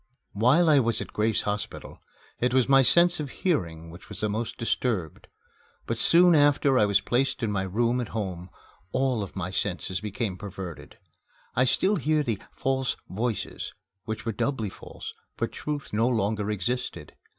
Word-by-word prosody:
While 130 Hz, +11 st, +4 dB
I 150 Hz, -3 st, +6 dB
was 115 Hz, -3 st, +1 dB
at -, -, -6 dB
Grace 110 Hz, +1 st, +1 dB
Hospital, 105 Hz, 0 st, -4 dB, 0.4 s
it 125 Hz, +1 st, +1 dB
was 130 Hz, -2 st, +4 dB
my 135 Hz, 0 st, +6 dB
sense 170 Hz, +9 st, +4 dB
of 145 Hz, -2 st, -3 dB
hearing 85 Hz, -, -2 dB
which 85 Hz, +2 st, -13 dB
was -, -, -4 dB
the 105 Hz, -, 0 dB
most 110 Hz, +3 st, -3 dB
disturbed. 110 Hz, -, -2 dB, 0.6 s
But -, -, -2 dB
soon 175 Hz, +1 st, +6 dB
after 145 Hz, -3 st, +4 dB
I 105 Hz, -, +4 dB
was 100 Hz, 0 st, +3 dB
placed 130 Hz, +1 st, 0 dB
in 110 Hz, -, +1 dB
my 100 Hz, -2 st, 0 dB
room 115 Hz, +6 st, +1 dB
at 120 Hz, -, -4 dB
home, 95 Hz, -5 st, -4 dB, 0.4 s
all 130 Hz, -3 st, +1 dB
of 100 Hz, -, -6 dB
my 90 Hz, -1 st, -3 dB
senses 95 Hz, 0 st, -2 dB
became 105 Hz, -2 st, -3 dB
perverted. 95 Hz, -4 st, -8 dB, 0.6 s
I 125 Hz, -, +4 dB
still 195 Hz, +10 st, +2 dB
heard 155 Hz, 0 st, +1 dB
the 110 Hz, -5 st, -1 dB
"false 135 Hz, -1 st, -1 dB
voices" 110 Hz, +2 st, -3 dB, 0.3 s
which 110 Hz, +1 st, -4 dB
were 115 Hz, -, 0 dB
doubly 110 Hz, -1 st, -1 dB
false, -, -, -9 dB, 0.2 s
for -, -, +1 dB
Truth 145 Hz, -5 st, -5 dB
no 115 Hz, +3 st, +3 dB
longer 105 Hz, -3 st, 0 dB
existed. 120 Hz, +5 st, -3 dB
115 Hz, 170 wpm, -27 LUFS, 100-135 Hz, 0.6 s, I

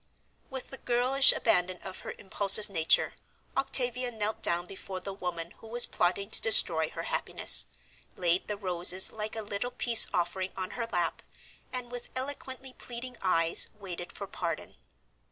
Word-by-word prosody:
With 265 Hz, -2 st, -8 dB
the 270 Hz, -, -9 dB
girlish 255 Hz, +3 st, +4 dB
abandon 180 Hz, -4 st, +1 dB
of 190 Hz, -1 st, -8 dB
her -, -, -8 dB
impulsive 200 Hz, +1 st, +3 dB
nature 165 Hz, -4 st, +1 dB, 0.4 s
Octavia 250 Hz, -2 st, 0 dB
knelt 220 Hz, -2 st, -4 dB
down 175 Hz, +1 st, +1 dB
before 190 Hz, 0 st, -8 dB
the 195 Hz, +2 st, -7 dB
woman 175 Hz, -3 st, -5 dB
who 225 Hz, -, -14 dB
was 240 Hz, +2 st, +4 dB
plotting 195 Hz, +4 st, -2 dB
to -, -, 0 dB
destroy 160 Hz, -7 st, +6 dB
her -, -, -7 dB
happiness, -, -, +3 dB, 0.5 s
laid 175 Hz, 0 st, +1 dB
the 210 Hz, -, -4 dB
roses 185 Hz, -1 st, +3 dB
like 215 Hz, 0 st, -5 dB
a 220 Hz, -, -4 dB
little 205 Hz, +4 st, -4 dB
peace 240 Hz, -2 st, +5 dB
offering 185 Hz, +2 st, -3 dB
on 185 Hz, -1 st, -5 dB
her 235 Hz, -2 st, -5 dB
lap, -, -, -2 dB, 0.5 s
and 250 Hz, -1 st, -5 dB
with 245 Hz, -1 st, -8 dB
eloquently 260 Hz, -1 st, -6 dB
pleading 245 Hz, +1 st, -8 dB
eyes 165 Hz, -3 st, +2 dB
waited 180 Hz, -4 st, -8 dB
for 200 Hz, -, -8 dB
pardon. 170 Hz, -4 st, -6 dB
200 Hz, 155 wpm, -28 LUFS, 180-245 Hz, 0.5 s, destroy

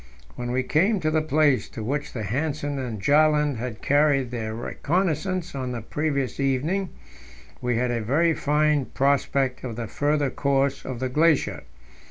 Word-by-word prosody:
When 120 Hz, 0 st, -5 dB
we 130 Hz, +1 st, 0 dB
came 190 Hz, -, +2 dB
to 155 Hz, -1 st, +1 dB
the 155 Hz, 0 st, +2 dB
place 150 Hz, -3 st, +2 dB
to 110 Hz, -, -7 dB
which 145 Hz, +6 st, -3 dB
Hanssen 145 Hz, +6 st, -2 dB
and 120 Hz, -5 st, -4 dB
Bjaaland 150 Hz, +2 st, +3 dB
had 115 Hz, -1 st, -6 dB
carried 140 Hz, -3 st, +3 dB
their 110 Hz, -2 st, -4 dB
reconnaissance 175 Hz, -, -1 dB
on 130 Hz, -2 st, -3 dB
the 120 Hz, -, -4 dB
previous 140 Hz, -1 st, -2 dB
evening, 145 Hz, +9 st, 0 dB, 0.7 s
we 125 Hz, -1 st, 0 dB
had 125 Hz, +1 st, 0 dB
a 120 Hz, -1 st, -1 dB
very 155 Hz, +9 st, +2 dB
fine 150 Hz, -1 st, +1 dB
prospect 135 Hz, -1 st, 0 dB
of 120 Hz, -3 st, -5 dB
the 120 Hz, 0 st, -4 dB
further 145 Hz, +4 st, 0 dB
course 140 Hz, -1 st, 0 dB
of 130 Hz, -2 st, -5 dB
the 130 Hz, -, -1 dB
glacier. 155 Hz, +2 st, +2 dB
140 Hz, 160 wpm, -25 LUFS, 125-155 Hz, 0.7 s, Bjaaland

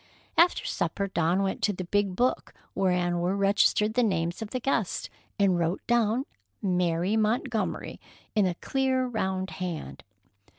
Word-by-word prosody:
After 345 Hz, +1 st, +4 dB
supper 200 Hz, -, -1 dB
Dawn 180 Hz, 0 st, +1 dB
went 190 Hz, -, -2 dB
to 205 Hz, -, +2 dB
the 185 Hz, -, -5 dB
big 200 Hz, +1 st, 0 dB
book 250 Hz, +6 st, 0 dB, 0.2 s
wherein 180 Hz, -2 st, +1 dB
were 180 Hz, +3 st, 0 dB
registered 205 Hz, +2 st, +3 dB
the 250 Hz, -, +3 dB
names 175 Hz, -4 st, 0 dB
of 220 Hz, -, -4 dB
the 255 Hz, -, -2 dB
guests, 235 Hz, -7 st, -1 dB, 0.3 s
and 190 Hz, -3 st, +3 dB
wrote 170 Hz, +2 st, -1 dB
down 235 Hz, +2 st, +2 dB, 0.3 s
"Mary 180 Hz, 0 st, +1 dB
Montgomery" 220 Hz, +1 st, -1 dB, 0.3 s
in 205 Hz, -3 st, +3 dB
a 175 Hz, -, -2 dB
clear, 260 Hz, +4 st, 0 dB
round 190 Hz, -5 st, -2 dB
hand. 160 Hz, -, -5 dB
195 Hz, 145 wpm, -27 LUFS, 180-225 Hz, 0.3 s, After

